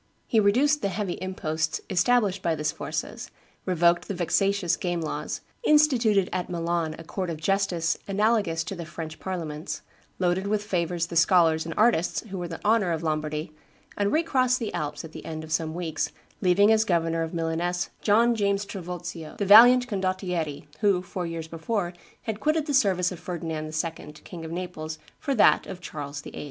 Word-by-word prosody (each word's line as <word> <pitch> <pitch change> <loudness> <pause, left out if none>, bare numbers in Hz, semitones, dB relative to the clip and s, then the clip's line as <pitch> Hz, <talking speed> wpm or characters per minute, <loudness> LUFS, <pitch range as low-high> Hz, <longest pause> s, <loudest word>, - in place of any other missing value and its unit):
He 225 - +2
reduced 265 +9 +3
the 200 - 0
heavy 190 -1 -3
imposts 160 -4 -2
established 195 0 +2
by 165 -3 +1
the 150 - -5
Sforzas, - - -3 0.4
revoked 175 -1 +3
the 200 - -3
vexatious 185 0 +1
game 175 -1 -2
laws, 155 - -4 0.2
instituted 250 - +4
at 180 0 -2
Milan 170 -2 -1
a 165 - -9
court 185 +2 -4
of 165 - -3
justice 175 -1 0
analogous 200 -5 +1
to 175 - -5
the 175 - -6
French 155 0 -7
parliaments, 165 -4 -5 0.3
loaded 185 +2 0
with 210 0 0
favors 175 -3 -1
the 170 - -8
scholars 165 -2 +4
and 165 - -5
artists 215 -6 +3
who 190 -1 -5
were 175 - -3
the 165 -1 -7
honor 210 -4 +3
of 165 0 -2
Lombardy, 155 0 -2 0.4
and 205 0 0
recrossed 260 -6 +2
the 230 -4 -4
Alps 150 +1 -3
at 160 - -10
the - - -9
end 160 -1 -6
of 160 - -10
some 160 0 -1
weeks, 170 -3 -2 0.3
leaving 200 +3 +5
as 220 0 +4
governor 165 -4 +1
of 165 0 -2
Milaness 170 +1 -1
John 230 +3 +4
James 200 -2 0
Trivulzio, 175 -4 -7
the 200 - -1
valiant 245 +5 +8
Condottiere, 185 -7 -2
who, 195 -3 +2
four 180 -1 -4
years 165 -1 -5
before, 175 +3 -2 0.3
had 220 -2 -4
quitted 310 +3 +1
the 295 - -2
service 190 -8 +3
of 180 - -7
Ferdinand 165 -4 -4
II., 155 -1 -4
King 165 +2 -10
of 160 - -7
Naples, 165 -3 -5 0.2
for 280 -3 -1
that 215 - +5
of 180 - -7
Charles 145 -4 -6
VIII. - - -9
180 Hz, 180 wpm, -26 LUFS, 165-205 Hz, 0.4 s, valiant